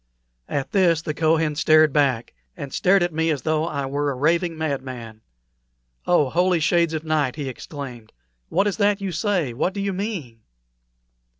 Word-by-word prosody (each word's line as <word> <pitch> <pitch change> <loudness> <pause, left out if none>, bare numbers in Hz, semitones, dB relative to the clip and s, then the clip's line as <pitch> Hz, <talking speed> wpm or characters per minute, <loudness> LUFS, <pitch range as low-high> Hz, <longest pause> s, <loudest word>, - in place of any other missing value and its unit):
At 140 +3 -3
this 175 -6 +3
the 155 - -3
Kohen 160 0 +1
started 155 0 +4
back, 135 -6 +1 0.2
and 140 -2 -7
stared 190 0 +3
at 175 -1 -1
me 160 +1 0
as 145 -6 -1
though 155 +1 0
I 140 -4 -3
were 145 +2 -1
a 140 - -2
raving 165 +5 +1
madman. 130 -7 -5 0.9
"Oh, 150 -7 +3
holy 180 0 +2
shades 165 +1 +2
of 155 - -4
night!" 155 -5 0
he 145 -3 -4
exclaimed. 125 -3 -8 0.4
"What 195 +4 +2
is 205 -1 -1
that 205 -1 +2
you 195 -2 -3
say? 175 - -1
What 180 - -1
do - - -3
you 200 0 -1
mean?" 180 - -5
155 Hz, 175 wpm, -23 LUFS, 140-175 Hz, 0.9 s, started